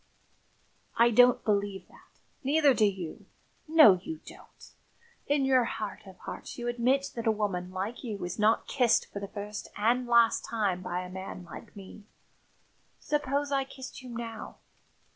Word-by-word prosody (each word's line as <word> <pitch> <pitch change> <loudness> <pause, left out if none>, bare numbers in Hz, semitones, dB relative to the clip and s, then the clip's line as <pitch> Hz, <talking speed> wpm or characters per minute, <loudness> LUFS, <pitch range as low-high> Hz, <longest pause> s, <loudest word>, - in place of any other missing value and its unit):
"I 235 +1 +5
don't 245 +2 +5
believe 200 -2 -1
that; - - -22 0.2
neither 285 +1 +4
do 220 - +3
you 190 -5 -4 0.4
no, 305 - +7
you 320 - -6
don't! - - -15 0.6
In 285 -1 +2
your 260 -2 +4
heart 215 -1 -5
of 190 -1 -12
hearts - - -8
you 240 -1 -4
admit 250 +3 +1
that 230 -1 -4
a - - +5
woman 195 -4 -2
like 195 +7 -5
you 210 -7 -4
is 180 +4 -5
not 215 +2 +3
kissed 245 -5 +2
for 200 - -4
the 200 - -5
first 205 +1 -6
and 240 +4 +1
last 235 -1 +4
time 200 -6 -1
by 180 0 -3
a 180 - -7
man 190 -1 -7
like 170 - -11
me. 200 +1 -12 0.9
Suppose 285 -1 -1
I 275 -1 +2
kissed 265 0 -10
you 255 - -10
now? 230 -1 -7
225 Hz, 160 wpm, -29 LUFS, 200-255 Hz, 0.9 s, no